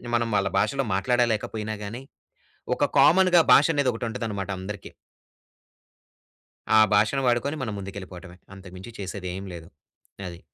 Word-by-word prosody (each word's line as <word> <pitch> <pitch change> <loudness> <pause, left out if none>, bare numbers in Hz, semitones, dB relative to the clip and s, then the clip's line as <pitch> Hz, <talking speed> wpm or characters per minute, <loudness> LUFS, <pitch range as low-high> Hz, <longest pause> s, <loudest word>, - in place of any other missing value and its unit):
మనం 115 -1 0
వాళ్ళ 100 -1 +1
భాషలో 135 +2 0
మాట్లాడలేకపోయినా 110 0 0
గానీ, 115 +6 -7 0.7
ఒక - - +1
కామన్‌గా 180 -1 +6
భాష 145 - +7
అనేది 140 -3 +2
ఒకటి 115 - -5
ఉంటదనమాట 105 -4 -4
అందరికీ. 100 +1 -7 1.9
ఆ - - +8 0.2
భాషను 110 +7 +2
వాడుకొని 125 +5 +1
మనం 110 -4 -4
ముందుకెళ్ళిపోవడమే, 95 -2 -9 0.2
అంతకు 95 -1 -13
మించి 105 +6 -10
చేసేది 95 -1 -5
ఏమి 95 0 -7
లేదు. 80 -1 -11 0.6
అది. 85 -1 -11
105 Hz, 130 wpm, -25 LUFS, 95-120 Hz, 1.9 s, ఆ